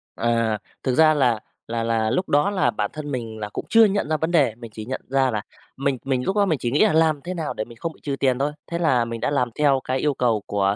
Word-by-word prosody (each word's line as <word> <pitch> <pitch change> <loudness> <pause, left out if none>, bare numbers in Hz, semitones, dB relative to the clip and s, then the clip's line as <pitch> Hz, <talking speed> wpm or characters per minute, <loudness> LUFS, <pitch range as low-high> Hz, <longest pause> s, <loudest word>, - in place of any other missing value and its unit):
À, 115 -2 +1 0.3
thực 130 - 0
ra 155 +1 +6
là 125 -7 +2 0.3
là 115 0 -2
là 115 -1 +1
lúc 130 +11 -1
đó 145 +7 +3
là 200 -2 +1
bản 105 -1 -2
thân 150 -1 -6
mình 115 -4 -5
là 105 -1 -4
cũng - - -6
chưa 225 +1 +7
nhận 205 -5 0
ra 155 - +1
vấn 160 +2 -1
đề, 140 -10 +3
mình 115 -1 -10
chỉ 110 -1 -7
nhận 130 +3 -4
ra 135 -1 +2
là 105 -2 -2 0.4
mình 140 0 0
mình 130 -2 0
lúc 195 - 0
đó 205 -1 +4
mình 165 -6 +1
chỉ 120 - -2
nghĩ 145 - +4
là 210 - +2
làm 160 -2 +3
thế 180 - -4
nào 160 -4 -3
để 110 - -3
mình 115 -1 -14
không 165 +6 -4
bị - - -22
trừ 140 -2 -2
tiền 130 -2 +2
thôi. 145 +2 0 0.2
Thế 170 - -1
là 130 -8 +2
mình 115 -1 -6
đã - - 0
làm 125 -4 +1
theo 140 -3 +4
cái 130 - -1
yêu 150 +1 +1
cầu 120 -5 +1
của 100 0 +1
130 Hz, 290 wpm, -23 LUFS, 115-155 Hz, 0.4 s, chưa